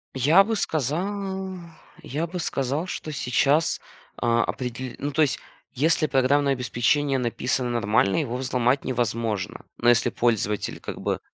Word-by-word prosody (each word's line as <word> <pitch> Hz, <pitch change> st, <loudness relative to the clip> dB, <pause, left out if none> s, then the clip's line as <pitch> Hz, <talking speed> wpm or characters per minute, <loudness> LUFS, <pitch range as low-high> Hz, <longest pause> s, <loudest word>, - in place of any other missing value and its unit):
Я 150 Hz, +9 st, +6 dB
бы 225 Hz, +2 st, -1 dB
сказал 190 Hz, -, -2 dB, 0.5 s
я 155 Hz, +5 st, -2 dB
бы 180 Hz, +2 st, -5 dB
сказал, 140 Hz, +1 st, -1 dB
что 155 Hz, -, -5 dB
сейчас, 140 Hz, +3 st, +2 dB, 0.4 s
а, 115 Hz, 0 st, +2 dB
определ 125 Hz, 0 st, -4 dB
ну, 145 Hz, -, -3 dB
то 155 Hz, +3 st, +1 dB
есть 145 Hz, -4 st, +2 dB, 0.3 s
если 155 Hz, +3 st, +2 dB
программное 140 Hz, +1 st, +3 dB
обеспечение 135 Hz, +3 st, +1 dB
написано 125 Hz, +1 st, -1 dB
нормально, 105 Hz, -4 st, +2 dB
его 130 Hz, -7 st, -1 dB
взломать 125 Hz, 0 st, +1 dB
невозможно. 115 Hz, -5 st, -2 dB
Но, 120 Hz, -, -1 dB
если 120 Hz, -2 st, +4 dB
пользователь 105 Hz, -3 st, 0 dB
как -, -, -6 dB
бы -, -, -1 dB
135 Hz, 140 wpm, -25 LUFS, 120-155 Hz, 0.5 s, Я